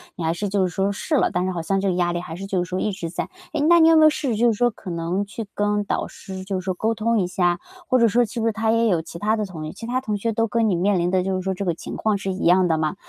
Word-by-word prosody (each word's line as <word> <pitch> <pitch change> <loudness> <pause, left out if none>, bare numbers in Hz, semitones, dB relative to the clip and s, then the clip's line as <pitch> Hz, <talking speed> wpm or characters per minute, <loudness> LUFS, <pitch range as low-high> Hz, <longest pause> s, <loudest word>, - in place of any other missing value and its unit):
你 175 - -5
还 160 +1 +1
是 205 +4 -3
就 195 0 0
是 - - +1
说 195 +1 0
试 250 +10 -2
了， - - +2
但 180 +1 0
是 185 - -1
好 175 -2 -3
像 195 +4 0
这 195 - 0
个 - - +1
压 175 -1 +1
力 175 - -1
还 165 -2 -7
是 195 +2 -6
就 190 -2 0
是 175 - -9
说 185 - -2
一 210 - 0
直 180 -4 -5
在。 - - -4 0.2
诶， 310 - 0
那 340 +1 +7
你 325 0 +7
有 325 - +6
没 315 - +6
有 310 - +8
试 295 -2 -2
试 225 - 0
就 235 +2 +3
是 230 - +3
说 240 +3 +2
可 205 -4 -10
能 170 +4 -2
去 215 +2 -6
跟 205 0 +1
导 - - -1
师 190 -1 -9
就 190 -1 -3
是 - - -16
说 185 - 0
沟 220 +5 0
通 225 +1 +1
一 180 - 0
下， 175 -1 +1 0.3
或 255 -1 +3
者 235 - +5
说 240 +3 +3
是 225 +2 -6
不 225 - -1
是 225 - +3
他 220 +1 0
也 230 0 +3
有 175 -5 +2
其 165 - -10
他 215 +3 +1
的 215 -1 -2
同学 155 -4 -7
其 230 - -9
他 255 +1 -1
同 215 -5 -2
学 230 +3 -1
都 225 +1 +1
跟 225 0 +1
你 185 - +2
面 185 +2 +2
临 175 +1 +1
的 185 -1 +2
就 190 0 -1
是 185 - -2
说 190 +1 -1
这 195 +2 -4
个 175 - +1
情 - - -8
况 215 -2 0
是 195 0 -3
一 190 - -4
样 180 +1 +5
的 160 -2 +1
吗？ 155 +3 -1
195 Hz, 385 characters per minute, -23 LUFS, 180-225 Hz, 0.3 s, 有